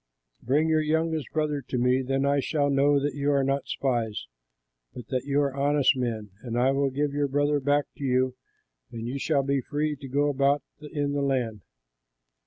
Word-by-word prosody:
Bring 145 Hz, +6 st, +2 dB
your 160 Hz, -1 st, +3 dB
youngest 160 Hz, 0 st, 0 dB
brother 150 Hz, -2 st, -1 dB
to 125 Hz, -, -2 dB
me; 125 Hz, +2 st, +2 dB
then 135 Hz, +1 st, 0 dB
I 140 Hz, 0 st, +2 dB
shall 145 Hz, 0 st, 0 dB
know 140 Hz, +1 st, +4 dB
that 145 Hz, +1 st, -1 dB
you 145 Hz, 0 st, -1 dB
are 140 Hz, -1 st, +3 dB
not 135 Hz, +1 st, -1 dB
spies, 120 Hz, -5 st, -1 dB, 0.7 s
but 120 Hz, -3 st, -8 dB
that 130 Hz, 0 st, -2 dB
you 140 Hz, 0 st, +1 dB
are 140 Hz, -2 st, -1 dB
honest 145 Hz, 0 st, +3 dB
men; 115 Hz, -5 st, -3 dB
and 120 Hz, -1 st, -4 dB
I 130 Hz, +2 st, +3 dB
will 135 Hz, 0 st, +1 dB
give 140 Hz, +2 st, -1 dB
your 145 Hz, 0 st, +1 dB
brother 145 Hz, +1 st, +1 dB
back 145 Hz, +1 st, +2 dB
to -, -, -7 dB
you 130 Hz, -1 st, +1 dB, 0.6 s
and 115 Hz, -1 st, -6 dB
you 135 Hz, +3 st, -3 dB
shall 140 Hz, -1 st, +1 dB
be 140 Hz, 0 st, 0 dB
free 150 Hz, +3 st, -2 dB
to 135 Hz, 0 st, -9 dB
go 145 Hz, +3 st, +1 dB
about 140 Hz, 0 st, +2 dB, 0.2 s
in 145 Hz, -2 st, -2 dB
the 145 Hz, -, 0 dB
land.'" 125 Hz, -6 st, -1 dB
140 Hz, 195 wpm, -26 LUFS, 130-145 Hz, 0.7 s, know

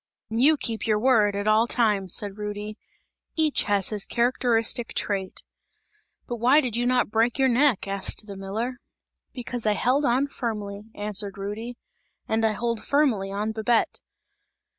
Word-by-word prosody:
"And 225 Hz, +2 st, 0 dB
you 305 Hz, +3 st, +5 dB
keep 225 Hz, -5 st, -3 dB
your 215 Hz, -1 st, +3 dB
word, 215 Hz, -4 st, +3 dB
at 200 Hz, +1 st, -2 dB
all 215 Hz, +2 st, +4 dB
times," 210 Hz, -7 st, +1 dB
said 205 Hz, 0 st, -1 dB
Rudy, 210 Hz, 0 st, -5 dB, 0.6 s
"each 315 Hz, -2 st, +2 dB
has 200 Hz, -2 st, 0 dB
his 210 Hz, -2 st, -2 dB
characteristic 235 Hz, -1 st, +1 dB
trait!" 195 Hz, -2 st, -2 dB, 0.8 s
"But 240 Hz, -, -5 dB
why 250 Hz, +6 st, +5 dB
did 250 Hz, -6 st, -2 dB
you 240 Hz, +1 st, 0 dB
not 250 Hz, -4 st, +1 dB
break 225 Hz, +2 st, +1 dB
your 265 Hz, -1 st, +3 dB
neck?" 250 Hz, -4 st, +2 dB
asked 195 Hz, +2 st, -1 dB
the 200 Hz, -2 st, -8 dB
miller. 215 Hz, +6 st, -4 dB, 0.5 s
"Because 245 Hz, -2 st, -5 dB
I 210 Hz, -, +4 dB
held 255 Hz, +7 st, +1 dB
on 260 Hz, +1 st, +2 dB
firmly," 210 Hz, -6 st, -5 dB
answered 205 Hz, -1 st, -1 dB
Rudy, 215 Hz, +5 st, -6 dB, 0.5 s
"and 220 Hz, 0 st, 0 dB
I 220 Hz, -1 st, +2 dB
hold 235 Hz, +1 st, -2 dB
firmly 245 Hz, -10 st, +1 dB
on 210 Hz, +2 st, -2 dB
Babette!" 220 Hz, +1 st, 0 dB
225 Hz, 160 wpm, -25 LUFS, 205-245 Hz, 0.8 s, you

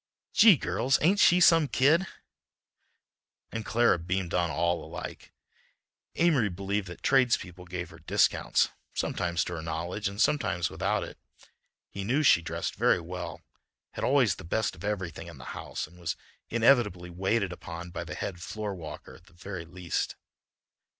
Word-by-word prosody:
"Gee! 210 Hz, -6 st, +8 dB
girls, 130 Hz, +1 st, +1 dB
ain't 190 Hz, +6 st, +4 dB
she 180 Hz, -2 st, +6 dB
some 165 Hz, -3 st, +6 dB
kid!" 150 Hz, +9 st, +3 dB, 1.4 s
And 115 Hz, -, -4 dB
Clara 115 Hz, -5 st, +3 dB
beamed 90 Hz, +1 st, -2 dB
on 85 Hz, -1 st, +1 dB
all 85 Hz, +2 st, 0 dB
alike. -, -, -8 dB, 0.8 s
Amory 150 Hz, -11 st, +3 dB
believed 100 Hz, +2 st, -2 dB
that 90 Hz, -, -10 dB
tradespeople 115 Hz, -9 st, +2 dB
gave 90 Hz, -1 st, -5 dB
her 80 Hz, -, -13 dB
discounts, 75 Hz, -, +2 dB, 0.3 s
sometimes 85 Hz, 0 st, -1 dB
to 90 Hz, -, -5 dB
her 80 Hz, -, -4 dB
knowledge 85 Hz, +6 st, -3 dB
and 100 Hz, +1 st, -9 dB
sometimes 90 Hz, -, +1 dB
without -, -, 0 dB
it. -, -, -9 dB, 0.7 s
He 100 Hz, -, -6 dB
knew 130 Hz, +9 st, +1 dB
she 85 Hz, -, +6 dB
dressed 85 Hz, -, -3 dB
very -, -, +3 dB
well, -, -, -6 dB, 0.5 s
had -, -, -6 dB
always 130 Hz, -8 st, +3 dB
the -, -, -9 dB
best 110 Hz, +6 st, -1 dB
of 80 Hz, -, -13 dB
everything 95 Hz, -6 st, -3 dB
in -, -, -10 dB
the -, -, -11 dB
house, -, -, -5 dB
and 90 Hz, -, -18 dB
was 85 Hz, -2 st, -2 dB, 0.3 s
inevitably 110 Hz, -7 st, +3 dB
waited 95 Hz, +2 st, 0 dB
upon 85 Hz, 0 st, -8 dB
by -, -, -4 dB
the -, -, -7 dB
head 90 Hz, -3 st, -5 dB
floor 105 Hz, +2 st, -4 dB
walker 80 Hz, -5 st, -9 dB
at -, -, -17 dB
the -, -, -20 dB
very 85 Hz, 0 st, -7 dB
least. 90 Hz, 0 st, -3 dB
95 Hz, 160 wpm, -28 LUFS, 85-120 Hz, 1.4 s, Gee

